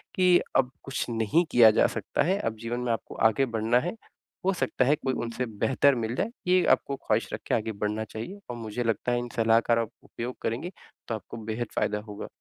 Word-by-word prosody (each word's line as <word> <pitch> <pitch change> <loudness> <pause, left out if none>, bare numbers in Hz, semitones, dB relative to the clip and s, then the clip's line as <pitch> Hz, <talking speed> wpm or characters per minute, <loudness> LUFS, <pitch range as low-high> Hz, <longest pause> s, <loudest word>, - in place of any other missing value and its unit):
कि 180 -1 +5 0.2
अब 130 -1 +2
कुछ 135 - -3
नहीं 115 +8 +2
किया 115 -5 +8
जा - - +4
सकता 110 +5 -1
है, 190 +4 +1
अब 115 -1 -2
जीवन 115 +2 -3
में 125 -1 0
आपको 115 - -6
आगे 135 +5 +1
बढ़ना 115 0 +1
है। 175 +7 -2 0.5
हो 195 - +3
सकता 130 -6 0
है 145 +3 +4
कोई 135 -4 -1
उनसे 120 +1 -3
बेहतर 130 +5 +2
मिल 115 0 -2
जाए, 205 - 0 0.2
ये 185 0 +4
आपको 140 - +2
ख़्वाहिश 110 -3 -1
रख - - -4
के - - +2
आगे 110 0 -1
बढ़ना 105 +1 -1
चाहिए। 115 - -7
और 120 - -4
मुझे 115 +1 -3
लगता 115 +2 0
है 120 - +2
इन 120 0 -5
सलाह 115 0 +4
कार 115 0 +2
आप 115 -1 -2
उपयोग 120 +2 -6
करेंगी, 125 +11 -2 0.4
तो 115 - -1
आपको 110 +2 -8
बेहद 110 +2 -3
फ़ायदा 105 0 +1
होगा। 105 - -6
120 Hz, 225 wpm, -27 LUFS, 110-135 Hz, 0.5 s, किया